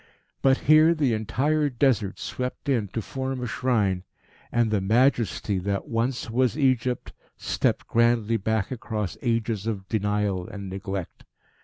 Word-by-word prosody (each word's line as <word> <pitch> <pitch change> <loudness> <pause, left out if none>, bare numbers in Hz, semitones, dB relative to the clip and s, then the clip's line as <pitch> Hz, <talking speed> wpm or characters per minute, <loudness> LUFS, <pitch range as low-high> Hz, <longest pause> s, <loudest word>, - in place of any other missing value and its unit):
But 135 0 +3
here 155 +3 +6
the 140 -6 +1
entire 145 +8 +1
Desert 120 -6 +1
swept 125 +2 -5
in 120 -7 +1
to 110 +3 -4
form 130 +2 -4
a 125 - -3
shrine, 105 -7 0 0.5
and 120 -2 +2
the 105 -2 +1
Majesty 110 -2 +2
that 100 +1 -2
once 120 +2 -1
was 125 +3 +1
Egypt 130 -3 +1 0.2
stepped - - 0
grandly 115 -1 +2
back 110 +1 -1
across 110 -5 -3
ages 115 -3 -1
of 100 -4 -3
denial 105 -3 0
and 100 -2 -7
neglect. 95 -1 -5
115 Hz, 140 wpm, -25 LUFS, 105-130 Hz, 0.5 s, here